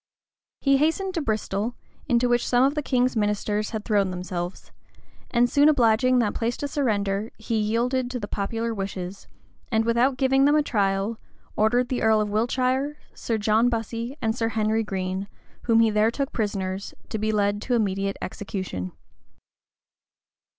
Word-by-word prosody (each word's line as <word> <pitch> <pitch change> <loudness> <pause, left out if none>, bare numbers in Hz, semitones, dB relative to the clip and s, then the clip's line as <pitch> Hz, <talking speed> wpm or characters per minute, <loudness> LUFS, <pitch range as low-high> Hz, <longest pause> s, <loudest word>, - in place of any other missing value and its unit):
He 275 -1 +4
hastened 325 +6 +1
to 335 - -1
Bristol, 220 -2 -2 0.3
into 240 0 +3
which 240 0 +1
some 245 0 +4
of 275 +2 +3
the 300 - -1
king's 255 -2 +1
ministers 210 0 0
had 220 -2 -5
thrown 205 -4 +2
themselves; 180 0 -5 0.6
and 240 0 +3
soon 290 +4 +5
obliging 255 -2 +4
that 230 -4 +2
place 230 +1 -2
to 285 - -3
surrender, 215 -6 -1
he 225 0 -2
yielded 245 +4 0
to 250 -1 -4
the 205 - -5
popular 225 +3 -2
wishes, 195 -2 -5 0.4
and 225 -1 +2
without 240 +3 +2
giving 270 0 +3
them 290 +1 +4
a 305 - +4
trial, 200 -2 0 0.4
ordered 240 +3 +2
the 255 - -1
earl 220 -1 +4
of 210 -1 -1
Wiltshire, 255 +6 0 0.2
Sir 230 - -2
John 220 +3 +3
Bussy, 230 +3 -3
and 220 0 +1
Sir 230 -2 0
Henry 220 0 +1
Green, 190 -2 -3 0.4
whom 230 -1 +4
he 225 -1 +4
there 210 +1 +3
took 275 +3 -3
prisoners, 195 -3 -3
to 220 - -3
be 215 +1 0
led 205 -1 +1
to 245 +2 0
immediate 195 -3 0
execution. 185 - -5
225 Hz, 165 wpm, -25 LUFS, 205-250 Hz, 0.6 s, soon